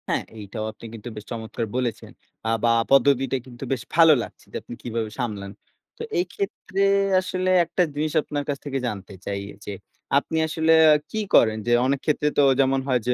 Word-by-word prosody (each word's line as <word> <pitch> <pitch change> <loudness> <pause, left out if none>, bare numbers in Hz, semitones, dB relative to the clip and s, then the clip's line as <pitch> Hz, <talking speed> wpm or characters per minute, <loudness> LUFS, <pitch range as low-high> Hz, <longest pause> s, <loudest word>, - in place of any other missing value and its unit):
হ্যাঁ, - - 0
এইটাও 110 +1 -6
আপনি 110 - -14
কিন্তু 115 +1 -8
বেশ 105 0 -8
চমৎকার 115 0 -4
বলেছেন। 125 -3 -2 0.4
আ - - +1
বা 120 - +4 0.2
পদ্ধতিটা 135 -1 +4
কিন্তু 120 +1 -10
বেশ 125 - -3
ভালো 165 -1 +8
লাগছে - - -12
যে, - - -11
আপনি - - -10
কিভাবে 115 -2 -3
সামলান। 105 -5 -3 0.5
তো - - -10 0.2
এই 355 - +1
ক্ষেত্রে 205 - -3 0.4
আসলে 185 0 -2 0.2
একটা 180 +2 +1
জিনিস 150 +1 -1
আপনার 145 -1 -4
কাছ 140 - -1
থেকে 135 -1 -2
জানতে 100 -3 -6
চাই, 100 0 -3 0.2
যে, - - -5 0.5
আপনি 160 +3 -1
আসলে 160 +1 +1 0.2
আ - - +6 0.2
কি 220 - -2 0.2
করেন? 110 -1 +5
যে, - - +2
অনেক 140 +1 +1
ক্ষেত্রে 150 -1 +1
তো - - +6 0.2
যেমন 135 0 +3
হয় 130 -2 +2
যে, 125 - +3
130 Hz, 190 wpm, -24 LUFS, 110-150 Hz, 0.5 s, ভালো